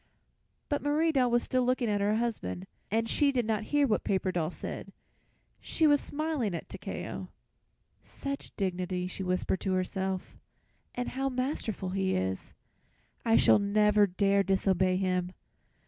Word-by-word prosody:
But 290 - -1
Marie 305 +3 +2
Doll 260 -4 +3
was 240 0 +2
still 255 - +1
looking 250 -1 +1
at 205 -1 +1
her 205 +1 +2
husband, 150 - -2 0.2
and 225 +2 +1
she 285 +4 +3
did 245 -4 0
not 220 -1 -1
hear 290 +2 +3
what 220 -5 +1
Paper 190 -1 0
Doll 165 -3 -1
said. - - -7 0.7
She 320 - 0
was 290 -1 +5
smiling 285 - -2
at - - -6
Takeo. - - -6 0.8
"Such 275 0 -6
dignity," 185 -2 -2
she 185 +1 -5
whispered 185 0 0
to 190 - -1
herself, 190 0 -2 0.6
"and 245 0 -2
how 270 +1 -1
masterful 255 -7 -2
he 190 0 0
is. 95 0 -2 0.7
I 225 -1 +3
shall - - +6
never 210 0 +4
dare 200 +2 +2
disobey 190 -1 +2
him. 185 -1 0
205 Hz, 150 wpm, -30 LUFS, 185-255 Hz, 0.8 s, shall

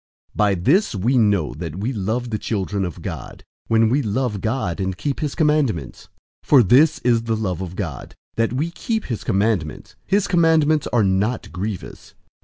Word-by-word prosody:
005:002 - - -19
By 105 -2 +3
this 140 - +2
we 120 +7 +1
know 100 -8 +2
that 80 0 -6
we 110 +8 -2
love 115 +4 -2
the 110 - -1
children 100 -2 -2
of 90 - -7
God, - - -7 0.2
when 115 0 +3
we 130 +6 +2
love 110 -2 -2
God 110 -7 -2
and 95 -1 -2
keep 140 +5 -3
his 150 -2 -3
commandments. 150 - 0 0.3
005:003 - - -28
For 135 -5 +7
this 140 - +5
is 120 -2 +2
the 115 -1 0
love 95 -5 -2
of 95 -1 -6
God, 85 -10 -6 0.2
that 115 0 +1
we 150 +7 -2
keep 220 +5 -3
his 115 -4 -4
commandments. 100 -6 -1
His 200 +1 +2
commandments 160 -3 +3
are 120 -3 +2
not 100 +5 0
grievous. 95 +1 -6
110 Hz, 185 wpm, -21 LUFS, 95-135 Hz, 0.3 s, For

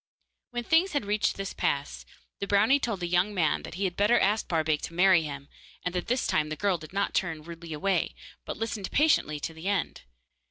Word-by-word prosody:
When 240 -1 -4
things 325 - +3
had 285 -8 0
reached 210 +1 +1
this 195 0 -4
pass, - - -2 0.3
the 200 - -3
brownie 215 +8 +4
told 225 -8 -2
the 175 - -1
young 180 +4 +1
man 165 -4 +1
that - - -8
he 195 - -3
had 180 -2 -1
better 210 +5 +4
ask 210 +3 +1
Barbaik 160 -3 +1
to 165 - -10
marry 185 -1 +5
him, 140 -2 -6 0.4
and 180 - -1
this 230 +8 -1
time 150 -1 +1
the 155 - -3
girl 195 0 0
did 155 - -11
not 200 +1 -1
turn 165 -4 -1
rudely 170 0 -9
away, 190 +6 0 0.3
but - - -6
listened 220 -3 -3
patiently 285 - +2
to 165 - -4
the 160 +3 -7
end. 200 -3 -1
190 Hz, 210 wpm, -28 LUFS, 165-210 Hz, 0.4 s, marry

